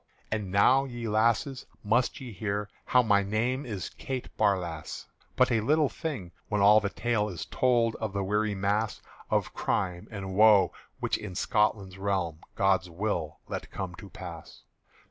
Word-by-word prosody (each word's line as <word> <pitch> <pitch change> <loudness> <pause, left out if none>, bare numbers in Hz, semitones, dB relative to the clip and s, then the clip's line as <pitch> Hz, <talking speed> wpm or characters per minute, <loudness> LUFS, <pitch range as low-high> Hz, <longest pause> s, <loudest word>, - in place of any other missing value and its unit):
And 105 -4 -2
now, 125 +7 +5
ye 120 -3 -5
lasses, 115 +5 +1 0.2
must 115 +4 +1
ye 130 -3 -7
hear 105 0 -2 0.2
How 125 -1 +4
my 100 -3 +4
name 120 +7 -1
is 100 -6 -4
Kate 130 -2 -5
Barlass: 90 -7 -1 0.3
But 130 0 +4
a 115 -2 +3
little 150 +5 +3
thing, 130 - -5 0.2
when 105 - +1
all 105 +2 +7
the 100 - -2
tale 110 -1 0
Is 90 - -5
told 120 -3 +2
of 110 -2 -3
the 100 0 -2
weary 105 +1 0
mass 105 +2 0 0.3
Of - - 0
crime 90 -2 -1
and 95 -3 -6
woe 105 -1 +6 0.3
which - - 0
in 90 - -7
Scotland's 100 -2 0
realm 95 -5 -1 0.2
God's 95 -2 +2
will 85 -4 -3
let - - -5
come 95 -2 -5
to 100 - -10
pass. 85 -4 -10
105 Hz, 165 wpm, -29 LUFS, 95-115 Hz, 0.3 s, all